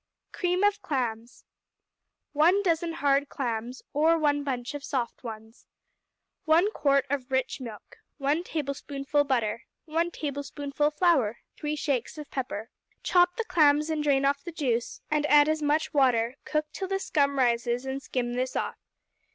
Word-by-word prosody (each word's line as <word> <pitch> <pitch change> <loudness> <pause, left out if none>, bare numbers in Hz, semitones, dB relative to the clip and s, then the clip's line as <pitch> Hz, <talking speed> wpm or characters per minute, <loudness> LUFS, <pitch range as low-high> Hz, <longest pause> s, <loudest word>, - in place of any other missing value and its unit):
Cream 360 +1 0
of 410 0 +2
Clams 245 - -3 0.9
1 345 +7 +4
dozen 335 -2 +1
hard 285 -3 +1
clams, 240 -1 -4
or 320 +3 +4
one 290 -2 +1
bunch 250 -3 -3
of 290 -1 -6
soft 260 -4 -3
ones. 220 -1 -9 0.8
1 335 +6 +4
quart 275 -7 +2
of 275 -2 -2
rich 260 0 -1
milk. 225 -5 -9 0.2
1 290 +4 0
tablespoonful 285 -2 -1
butter. 230 -5 -1 0.2
1 330 +2 0
tablespoonful 285 -1 -2
flour. 300 - +2 0.2
3 300 0 -3
shakes 280 -3 -2
of 300 -1 -9
pepper. 235 -4 -4 0.3
Chop 355 0 +4
the 460 - -2
clams 300 -3 +3
and 310 -1 0
drain 275 -2 +3
off 280 0 +1
the 345 - -6
juice 245 -7 -2
and 300 -1 +2
add 295 0 +6
as 310 0 0
much 300 +1 +1
water; 250 -4 +3
cook 305 0 0
till 380 - -4
the 390 +1 0
scum 280 -7 +1
rises, 240 0 +1
and 265 +1 -3
skim 245 -3 -2
this 255 +1 -2
off. - - -2
285 Hz, 155 wpm, -27 LUFS, 255-310 Hz, 0.9 s, add